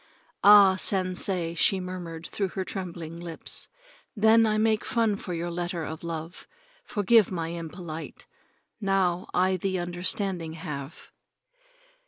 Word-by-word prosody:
"Ah, 200 -2 +8
Sensei," 185 -2 +1
she 190 +3 +3
murmured 180 -3 -6
through 200 - -2
her 190 +1 -4
trembling 170 -4 -6
lips. 170 -2 -6 0.5
"Then 220 +1 +5
I 215 0 +1
make 220 0 +2
fun 225 -3 +1
for 195 - -7
your 170 +1 -3
letter 175 -1 -3
of 160 +1 -6
love. 165 +1 -6 0.4
Forgive 215 - +3
my 165 -3 -3
impolite. 165 -1 -7 0.5
Now 190 -3 +1
I 185 +1 +2
the 190 +1 -1
understanding 175 -1 -2
have." 150 -2 -7
180 Hz, 125 wpm, -27 LUFS, 170-195 Hz, 0.5 s, Ah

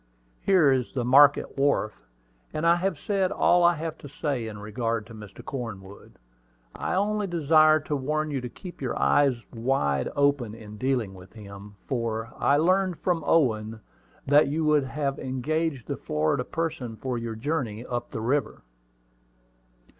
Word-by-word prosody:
Here 180 -8 +4
is 130 -1 -1
the 125 -3 -1
market 140 +2 +5
wharf; 135 -7 +2 0.6
and 155 - -1
I 170 +1 +5
have 185 -2 -1
said 195 +3 0
all 175 0 +3
I 175 0 +5
have 160 0 -5
to 145 - -10
say 140 -5 -3
in 105 -1 -7
regard 110 +1 -3
to 115 - -13
Mr. 105 -3 -11
Cornwood. 105 -8 -7 0.6
I - - -3
only 205 +1 0
desire 155 -2 +4
to 150 - -3
warn 155 +3 -1
you 135 -3 -2
to 125 - -5
keep 175 +6 -11
your 130 - -2
eyes 140 -3 +3 0.2
wide 115 - 0
open 140 -6 +1
in 105 -2 -11
dealing 125 -5 -1
with 90 0 -14
him, 100 -1 -11
for 115 -2 -3
I 140 - +3
learned 185 +2 +2
from 175 -4 -1
Owen 110 -8 +2 0.5
that 145 +2 +5
you 155 +2 +1
have 140 -1 0
engaged 135 +1 -2
the - - -4
Florida 80 +11 -1
person 160 -8 -3
for 125 +2 -3
your 115 -1 -5
journey 120 -3 -3
up 120 -1 -4
the 110 - -5
river." 125 0 -1
135 Hz, 160 wpm, -26 LUFS, 115-155 Hz, 0.6 s, market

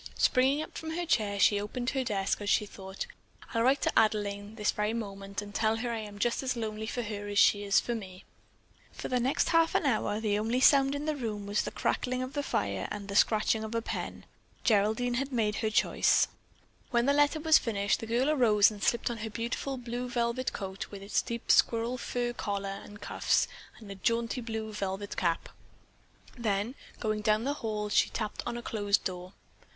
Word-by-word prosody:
Springing 270 +4 +3
up - - -12
from 320 0 -5
her 350 0 -2
chair, 210 -10 +1
she 205 0 +4
opened 245 +4 -3
her 265 -2 0
desk 200 -4 -1
as 205 - -2
she 210 - +3
thought, 190 -1 -7 0.5
"I'll 230 - +1
write 265 +4 +3
to - - +2
Adelaine 205 -1 0
this 210 -2 +1
very 210 +1 -1
moment 200 -2 -5
and 205 0 -10
tell 220 0 +2
her 240 +2 -3
that 235 - -1
I - - -3
am 205 -1 -8
just 235 +3 0
as 255 -1 -1
lonely 220 -1 -4
for 245 +2 -2
her 205 -2 -5
as 205 0 -3
she 205 0 +5
is 200 -1 +4
for 240 - -2
me." 190 -4 -7 0.7
For - - -6
the 250 - +1
next 255 +3 +1
half 330 -1 +3
hour, 220 -6 +1
the 210 -2 0
only 230 +4 0
sound 275 +1 +5
in 285 +1 -4
the 310 -1 0
room 215 -6 -4
was 205 +1 +1
the - - -3
crackling 255 0 -1
of 255 +1 -6
the 290 - -1
fire 100 - -1
and 205 -1 -6
the 200 - -4
scratching 220 +1 +3
of 220 +1 -5
the 230 - 0
pen. - - -5 0.4
Geraldine 220 +3 +2
had 275 +1 -3
made 215 -4 0
her 220 - 0
choice. 215 - +3 0.6
When 240 -1 +2
the 280 - +4
letter 290 +2 +3
was 315 0 +6
finished, 200 -3 0
the 225 - -6
girl 240 +4 +1
arose 220 -8 +5
and 205 -2 -10
slipped 235 0 +1
on 230 - -5
her 220 +1 -4
beautiful 240 +4 -3
blue 245 0 -4
velvet 240 +1 0
coat 190 -1 -5
with 200 -1 -9
its 200 - +1
deep 235 -1 -2
squirrel 235 +2 +3
fur 240 -1 -2
collar 200 -3 -3
and 205 0 -12
cuffs - - +1 0.3
and 210 -3 -11
a - - -4
jaunty 230 +5 -1
blue 220 -2 -4
velvet 200 0 -4
cap. 170 -2 0 0.9
Then, 220 0 -1 0.3
going 215 -2 -1
down 215 +1 +2
the 280 +3 0
hall, 210 -2 -2
she - - +3
tapped 215 -2 -3
on 240 0 -3
a 240 - -7
closed 205 -3 +1
door. 180 0 -5
220 Hz, 210 wpm, -30 LUFS, 205-245 Hz, 0.9 s, was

